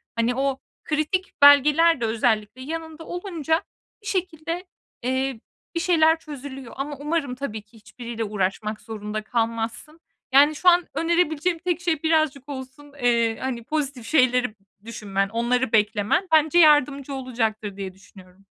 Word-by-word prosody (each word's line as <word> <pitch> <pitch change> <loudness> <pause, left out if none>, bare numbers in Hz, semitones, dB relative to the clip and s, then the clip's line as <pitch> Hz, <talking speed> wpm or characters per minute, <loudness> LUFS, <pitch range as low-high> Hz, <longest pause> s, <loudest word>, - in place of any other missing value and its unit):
Hani, 235 +1 +1
o 270 0 -1 0.2
kritik 310 +5 -2
belgeler 295 +2 +6
de - - +1
özellikle 220 +1 0
yanında 320 +2 -6
olunca 335 -4 -2 0.4
bir 410 - -11
şekilde, 355 -2 -3 0.4
eee, 260 0 -1 0.4
bir - - +1
şeyler 325 -2 +3
çözülüyor. 270 -5 -9
Ama 285 +2 -4
umarım 290 -4 -2
tabii 225 -6 -5
ki 210 +2 -22
hiçbiriyle 230 +1 -7
uğraşmak 210 +1 -2
zorunda 215 -1 -5
kalmazsın. 230 +7 -3 0.3
Yani, 290 +3 +6
şu 360 - +5
an 350 0 +3
önerebileceğim 335 0 +1
tek 355 -1 -2
şey 330 -3 -1
birazcık 310 -4 +1
olsun, 270 +1 -9
eee, 235 -2 +2
hani, 255 -3 -4
pozitif 275 -4 -3
şeyleri 250 -5 +2 0.3
düşünmen, 195 -3 -2
onları 240 +2 0
beklemen, 210 - +2
bence 315 +2 +4
yardımcı 285 -3 +4
olacaktır 225 -6 -3
diye 190 -2 -5
düşünüyorum. 190 0 -18
270 Hz, 135 wpm, -24 LUFS, 225-315 Hz, 0.4 s, belgeler